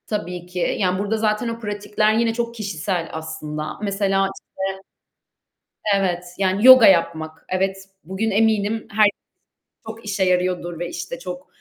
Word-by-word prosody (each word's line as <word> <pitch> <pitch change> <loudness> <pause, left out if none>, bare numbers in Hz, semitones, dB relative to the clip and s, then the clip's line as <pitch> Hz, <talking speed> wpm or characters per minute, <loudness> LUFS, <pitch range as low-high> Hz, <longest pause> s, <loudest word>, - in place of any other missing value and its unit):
Tabii 180 -4 -4
ki, 180 0 -2
yani 185 -2 +1
burda 205 +2 -1
zaten 215 +2 0
o 230 0 -4
pratikler 210 0 0
yine 225 0 +2
çok 235 0 -3
kişisel 200 -5 -3
aslında. 155 -1 -5
Mesela 195 -1 +1
işte - - -15 1.5
evet, 180 -2 -1
yani 195 +3 +2
yoga 255 -3 +10
yapmak, 160 -3 +2
evet, 190 +1 0 0.3
bugün 190 +6 -2
eminim 215 +1 +1
herkes 210 -1 +3 0.7
çok 225 0 -9
işe 200 -2 0
yarıyordur 180 -2 0
ve 175 0 -3
işte 175 +9 -6
çok 180 -5 -7
195 Hz, 140 wpm, -22 LUFS, 180-215 Hz, 1.5 s, yoga